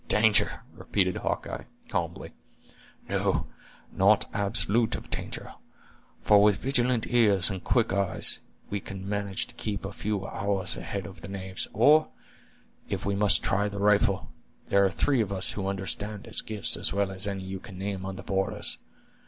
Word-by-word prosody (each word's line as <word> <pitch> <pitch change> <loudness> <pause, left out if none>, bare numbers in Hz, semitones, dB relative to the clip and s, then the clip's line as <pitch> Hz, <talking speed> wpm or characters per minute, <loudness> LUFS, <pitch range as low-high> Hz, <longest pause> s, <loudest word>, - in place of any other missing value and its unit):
"Danger!" 105 0 +4
repeated 95 -3 0
Hawkeye, - - -3 0.2
calmly; - - -3 0.8
"no, - - 0 0.5
not 100 +2 +4
absolutely 110 +2 +3
of - - -12
danger; - - -5 0.7
for, 105 -1 +6
with 105 -1 +5
vigilant 125 -3 +1
ears 105 -6 +3
and 95 -2 -5
quick 115 -5 +1
eyes, 100 -1 0 0.3
we 100 - -1
can 95 0 -8
manage 100 -2 -2
to - - -14
keep 100 -3 -4
a 100 - -4
few 100 -1 -3
hours 100 +1 -2
ahead 100 -2 -5
of 95 +1 -10
the - - -8
knaves; 95 -1 -4
or, 150 +8 +5 0.8
if - - -3
we 100 - 0
must 100 0 +3
try 100 +2 +1
the 100 - -7
rifle, 105 0 +2 0.4
there 100 0 +4
are 95 - +4
three 130 +6 +1
of 100 -3 -2
us 95 -2 0
who 95 -2 -4
understand 100 +1 -3
its 115 -1 -1
gifts 105 -2 +2
as - - +1
well 100 0 0
as 95 +1 +3
any 100 -1 -3
you 95 0 -5
can 95 -3 -11
name 95 0 -4
on 95 0 -5
the - - -8
borders. 95 0 -1
100 Hz, 170 wpm, -27 LUFS, 95-105 Hz, 0.8 s, for